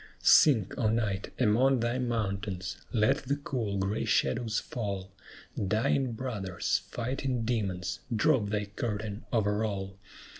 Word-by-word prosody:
Sink, 115 -11 +6
O 110 - +3
Night, 105 -4 -1
among 125 +3 +4
thy 120 +2 0
mountains! 100 -6 -2 0.2
let 115 +4 +3
the 140 0 -2
cool, 120 -8 -3
gray 100 +2 -1
shadows 110 0 +1
fall; 100 -5 -4 0.6
Dying 115 +5 +1
brothers, 110 -7 -2
fighting 125 0 -2
demons, 95 -6 -1 0.2
drop 110 -2 +3
thy 105 0 -1
curtain 105 0 -4
over 105 -2 +1
all! 100 -2 -4
110 Hz, 120 wpm, -30 LUFS, 100-120 Hz, 0.6 s, Sink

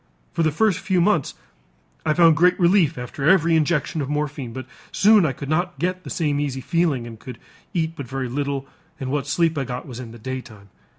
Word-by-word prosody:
For - - -1
the 160 - +3
first 190 +2 +2
few 185 -2 0
months, 170 -5 +1 0.7
I 155 - +3
found 165 -2 +6
great 180 +5 +3
relief 170 -4 +3
after 125 +4 -1
every 165 -3 +4
injection 155 0 +1
of 135 - -4
morphine, 145 -4 -3
but 130 +2 -7 0.3
soon 210 -4 +5
I - - 0
could 135 +2 -7
not 175 +1 -1
get 185 +4 -2
the - - -8
same 150 -4 0
easy 140 -3 -2
feeling 145 -3 0
and 115 -2 -10
could 125 -1 -9 0.3
eat 165 -3 -1
but 140 -5 -7
very 130 0 -3
little 140 +1 -2 0.3
and 130 -1 -4
what 140 -1 -1
sleep 165 +1 +1
I - - 0
got 125 -1 -5
was 125 -2 -8
in 125 -3 -7
the 120 - -11
daytime. 115 -4 -7
145 Hz, 215 wpm, -22 LUFS, 130-170 Hz, 0.7 s, found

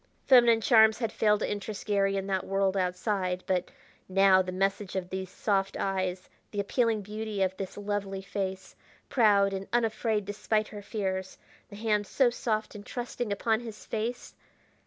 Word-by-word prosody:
Feminine 240 -4 +6
charms 220 -2 +6
had 230 -3 -2
failed 210 -2 +2
to - - 0
interest 205 0 -5
Garry 195 -1 +1
in 195 - -2
that 190 -2 -1
world 195 0 0
outside, 185 0 -1
but 180 -2 0 0.4
now 190 0 +5
the 185 0 -4
message 195 +1 -1
of 180 -1 -3
these 190 -1 -4
soft 195 -1 -1
eyes, 185 -1 -2 0.2
the 205 - -5
appealing 220 +1 +1
beauty 210 0 -3
of 190 0 -1
this 195 0 -6
lovely 200 -1 -3
face, 190 -1 -4 0.3
proud 200 -5 +4
and 195 0 -4
unafraid 220 -2 0
despite 215 +1 -1
her 205 -1 -8
fears, 190 -3 -3 0.3
the 205 - -10
hand 210 -1 0
so 260 -3 +3
soft 220 -2 -2
and 205 -1 -9
trusting 240 -1 -4
upon 220 +2 +1
his 225 -3 -9
face! 230 +3 -4
205 Hz, 165 wpm, -29 LUFS, 190-220 Hz, 0.4 s, Feminine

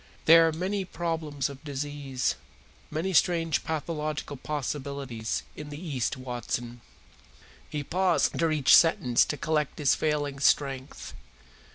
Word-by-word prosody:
"There 165 +1 +8
are - - +1
many 190 +5 -2
problems 160 -6 -3
of 140 0 -10
disease, 140 -2 -2 0.6
many 165 +5 -2
strange 165 -2 +2
pathological 155 -2 -3
possibilities, 140 -4 -4
in 150 0 -8
the 145 0 -7
East, 140 -6 -2
Watson." 120 -1 -5 0.9
He 150 -1 -3
paused 185 +5 +1
after 165 - +1
each 150 -4 +6
sentence 125 -7 +4
to 150 - -3
collect 150 0 -1
his 145 -3 +3
failing 145 -2 -1
strength. 135 -1 0
150 Hz, 125 wpm, -28 LUFS, 135-160 Hz, 0.9 s, There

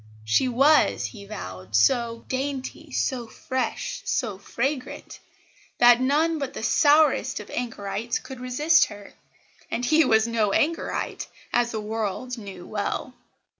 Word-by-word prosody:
She 110 - +3
was, 275 +5 +4
he 205 -4 -8
vowed, 95 - -7
so 230 - +2
"dainty, 265 0 -4
so 250 -4 -1
fresh, 260 +3 -3
so 210 -7 -2
fragrant," 255 +6 -4 0.6
that 240 0 +6
none 310 +5 +2
but 275 -2 -4
the - - -5
sourest 300 +6 +3
of - - -10
anchorites 230 -1 -3
could 265 -2 -9
resist 295 +6 +3
her 205 -1 -11 0.6
and 245 - -2
he 315 +5 +5
was 220 -4 +3
no 220 -3 +1
anchorite, 330 +3 -1 0.3
as 240 -1 +2
the 220 - -3
world 220 +3 -3
knew 195 -4 -9
well. 215 +4 -3
240 Hz, 130 wpm, -25 LUFS, 210-270 Hz, 0.6 s, that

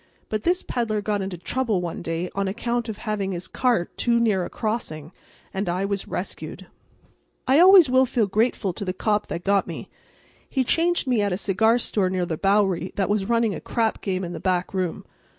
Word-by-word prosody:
But 215 -1 -1
this 360 +6 +1
peddler 225 -3 -1
got 205 0 -1
into 190 -2 -4
trouble 225 +2 -1
one 175 -2 -4
day 165 +1 -3
on 200 0 -1
account 235 +3 -2
of 215 - -5
having 205 -4 -2
his 175 0 -5
cart 240 -9 0
too 235 -1 +2
near 210 -6 +2
a - - -5
crossing, 170 -9 -4 0.4
and 195 -1 -2
I 180 +3 0
was 200 -1 -2
rescued. 185 - -5 0.8
I 270 +4 +5
always 370 -2 +8
will 260 +1 +4
feel 235 -2 +1
grateful 205 -1 0
to 200 - -5
the 185 -2 -2
cop 210 +2 0
that 170 - -5
got 200 0 +2
me. - - -7 0.6
He 265 - +1
changed 340 +6 +1
me 245 -5 +2
at 200 -1 0
a - - -1
cigar 220 +4 +2
store 205 -5 0
near 185 -1 -1
the 165 - -2
Bowery 195 -1 +1
that 195 -2 0
was 205 -1 0
running 230 -3 +2
a 160 - -6
crap 225 -2 -1
game 190 -2 -2
in 175 -1 -5
the 165 - -5
back 180 +2 -1
room. 185 -3 -2
205 Hz, 205 wpm, -24 LUFS, 185-235 Hz, 0.8 s, always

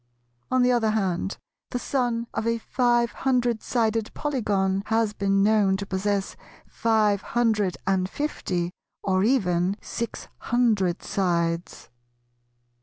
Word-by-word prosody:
On 255 -1 +3
the 250 - +4
other 235 -3 +2
hand 195 -3 -1 0.3
the - - -2
son 245 -2 -1
of 225 - -2
a 230 0 +1
five 240 0 +1
hundred 245 -4 0
sided 225 -2 0
Polygon 200 -9 0
has 225 -1 +1
been 195 -1 +1
known 205 -2 +3
to 200 - -5
possess 195 +1 -1 0.3
five 215 -3 +1
hundred 215 -6 +1
and 190 -1 +1
fifty, 180 - -2 0.3
or 190 -1 +2
even 190 -6 +2
six 235 0 -5
hundred 215 -7 +1
sides. 170 -5 -1
210 Hz, 120 wpm, -25 LUFS, 190-235 Hz, 0.3 s, the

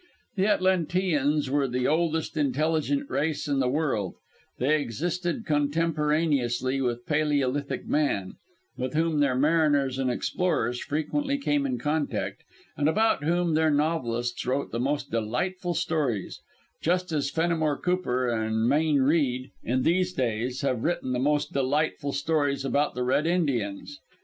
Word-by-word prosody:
The 195 0 +2
Atlanteans 175 -7 +1
were 140 -1 +2
the 125 0 0
oldest 160 0 0
intelligent 155 - 0
race 150 - -1
in 140 -2 +1
the 130 -2 +2
world 130 - -1 0.4
they 150 +4 +2
existed 175 - -3
contemporaneously 150 -4 +1
with 120 -1 -2
Paleolithic 145 -2 0
man, 140 -11 0 0.4
with 130 +2 -4
whom 160 -1 +1
their 140 -3 +2
mariners 145 -2 +2
and 130 -1 +1
explorers 125 -3 -1
frequently 275 - -1
came 280 0 0
in 260 -2 -2
contact, 150 -3 -2 0.3
and 145 +2 +2
about 220 -3 +2
whom 170 +1 +1
their 160 0 +3
novelists 135 -6 0
wrote 135 +2 -1
the 115 - -2
most 140 +4 -1
delightful 175 - -2
stories, 135 - -1 0.4
just 180 +1 0
as 145 -3 0
Fenimore 160 -2 0
Cooper 180 -9 0
and 110 -1 0
Mayne 150 +1 +3
Reid, 130 -4 +1
in 125 +2 0
these 185 +2 +2
days, 125 -1 -1
have 130 -4 -1
written 160 -6 -1
the 125 - 0
most 145 +3 +1
delightful 140 +1 0
stories 145 -1 0
about 145 +2 +1
the 125 - -1
Red 135 +5 +1
Indians. 145 - -1
145 Hz, 140 wpm, -27 LUFS, 130-165 Hz, 0.4 s, their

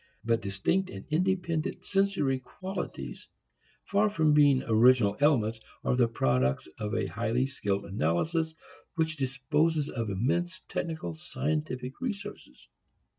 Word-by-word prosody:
But 115 0 +2
distinct 175 - 0
and - - -8
independent 170 -1 0
sensory 195 -10 +1
qualities, 185 +9 -6 0.6
far 205 +1 +2
from 160 -6 +3
being 145 -3 +5
original 115 -2 +5
elements, 115 -7 +3 0.2
are - - +2
the 125 -2 +4
products 65 - +1
of 105 +1 -2
a - - +1
highly 115 +3 0
skilled 105 -7 -2
analysis 155 - 0 0.4
which 160 -2 +1
disposes 145 +3 +1
of 115 -3 -3
immense 175 - -1
technical 160 - -3
scientific 130 - -3
resources. 220 -6 -6
135 Hz, 120 wpm, -29 LUFS, 115-165 Hz, 0.6 s, being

